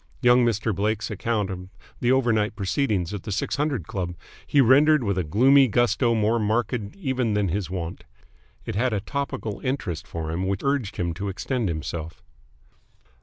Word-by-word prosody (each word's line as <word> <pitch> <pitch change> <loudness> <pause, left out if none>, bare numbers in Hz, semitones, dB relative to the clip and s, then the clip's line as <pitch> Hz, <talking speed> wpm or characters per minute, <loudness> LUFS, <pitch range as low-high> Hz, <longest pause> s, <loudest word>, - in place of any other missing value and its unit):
Young 125 0 +6
Mr. 110 -1 +1
Blake's 105 +2 -1
account 105 -1 -1
of 90 0 -7 0.3
the 120 - +2
overnight 115 -5 +2
proceedings 100 - -1
at 100 - -4
the 105 - -6
Six 100 - -1
Hundred 140 - -1
Club 90 -1 -4 0.3
he 145 - +3
rendered 140 +3 +5
with 100 -3 0
a 90 - 0
gloomy 130 - +5
gusto 120 +1 +2
more 110 +2 +2
marked 110 +4 0 0.2
even 130 - -1
than 100 -2 +1
his 95 0 -2
wont. 90 -2 -5 0.6
It - - -4
had 120 +4 +1
a 105 - +1
topical 115 -4 -4
interest 90 - -3
for 80 -1 -4
him 90 +3 -2
which 100 0 -2
urged 140 -7 -1
him 85 -3 -1
to 100 +4 -4
extend 115 +2 -2
himself. 80 +1 -5
105 Hz, 170 wpm, -25 LUFS, 95-125 Hz, 0.6 s, Young